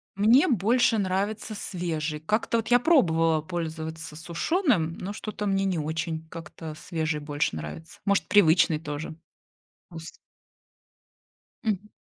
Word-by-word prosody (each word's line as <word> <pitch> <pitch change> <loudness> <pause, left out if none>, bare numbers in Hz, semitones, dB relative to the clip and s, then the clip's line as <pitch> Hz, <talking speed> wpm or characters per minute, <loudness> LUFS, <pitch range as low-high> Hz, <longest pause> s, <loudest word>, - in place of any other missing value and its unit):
Мне 230 - +5
больше 235 - +3
нравится 205 +3 -1
свежий. 165 -6 -3
Как-то 215 +8 0
вот 225 - -3
я 245 0 +6
пробовала 165 - +3
пользоваться 160 -1 -5
сушеным, 170 - 0
но 195 +3 -5
что-то 210 0 -5
мне 195 -1 +1
не 185 -3 0
очень, 160 +1 -3
как-то 160 -1 -8
свежий 155 -1 -2
больше 145 - -2
нравится. 80 - -8
Может, 200 0 +2
привычный 170 -4 +4
тоже 150 0 -6 0.8
ус 165 -1 -9 1.4
Мгм. 210 -1 -2
170 Hz, 120 wpm, -26 LUFS, 160-210 Hz, 1.4 s, я